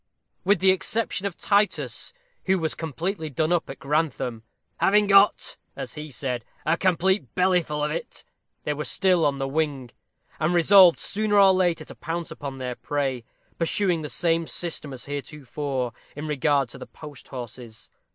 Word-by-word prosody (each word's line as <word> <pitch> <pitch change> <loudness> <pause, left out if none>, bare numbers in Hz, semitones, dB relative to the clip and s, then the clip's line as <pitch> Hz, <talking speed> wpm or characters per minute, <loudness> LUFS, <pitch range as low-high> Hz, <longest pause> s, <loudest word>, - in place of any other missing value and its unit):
With 195 -1 +3
the 190 0 +6
exception 190 +1 0
of 190 - -7
Titus, 205 0 0 0.3
who 190 0 +3
was 160 -3 -1
completely 160 - -3
done 155 +3 0
up 175 -2 +1
at 135 - -7
Grantham, 135 -5 -1 0.4
"having 210 +1 +4
got," 200 0 +4 0.2
as - - -6
he 150 0 -7
said, 125 -3 -3 0.2
"a 165 - +3
complete 185 - +1
bellyful 180 -5 +1
of 150 - -2
it," 165 - -6 0.4
they 150 - -1
were 150 +1 -4
still 185 -1 +2
on 140 -1 -1
the 135 0 -2
wing, 140 -4 -2 0.5
and 165 +3 +1
resolved 180 0 +7
sooner 210 0 0
or 195 -1 +7
later 175 -4 +1
to - - -10
pounce 165 +1 -5
upon 140 -2 -6
their 125 -1 -4
prey, 135 -2 -2 0.4
pursuing 175 0 +1
the 150 - -5
same 165 -1 +1
system 165 -4 -3
as 130 -2 -6
heretofore 140 -2 -4 0.2
in 150 +2 -5
regard 145 -2 +1
to - - -10
the - - -9
post 150 -3 -12
horses. 120 -3 -9
155 Hz, 165 wpm, -25 LUFS, 140-185 Hz, 0.5 s, resolved